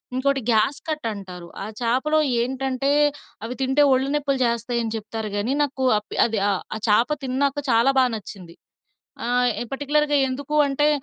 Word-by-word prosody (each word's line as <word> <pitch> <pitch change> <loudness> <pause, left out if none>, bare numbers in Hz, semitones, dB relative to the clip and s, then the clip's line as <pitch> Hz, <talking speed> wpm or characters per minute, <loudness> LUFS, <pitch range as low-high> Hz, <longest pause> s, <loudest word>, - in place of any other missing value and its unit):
ఇంకోటి 275 +1 +1
gas 220 +6 +2
cut 305 -4 -3
అంటారు. 185 -3 -9 0.2
ఆ - - -4 0.2
చేపలో 260 +7 +1 0.2
ఏంటంటే 265 +2 -1 0.5
అవి 230 +2 -4
తింటే 265 +2 +2
ఒళ్ళు 260 +1 +1
నొప్పులు 280 -2 0
చేస్తాయి 235 +1 -1
అని 225 - -3
చెప్తారు 220 0 -5
గానీ, 215 +5 -1
నాకు 270 -2 -3
అప్ 210 - -7
అది 225 -2 -1
ఆహ్, 195 - 0
ఆ - - -2
చేప 230 +6 +4 0.2
తిన్నాక 275 +2 0
చాలా 230 +4 +4
బాగా 250 -2 +3
నచ్చింది. 190 -5 -10 0.7
ఆహ్, 245 0 +2 0.2
పార్టిక్యులర్‌గా 290 +1 +1
ఎందుకు 275 +3 -4
అంటే 290 +2 +2
255 Hz, 160 wpm, -23 LUFS, 225-275 Hz, 0.7 s, చేప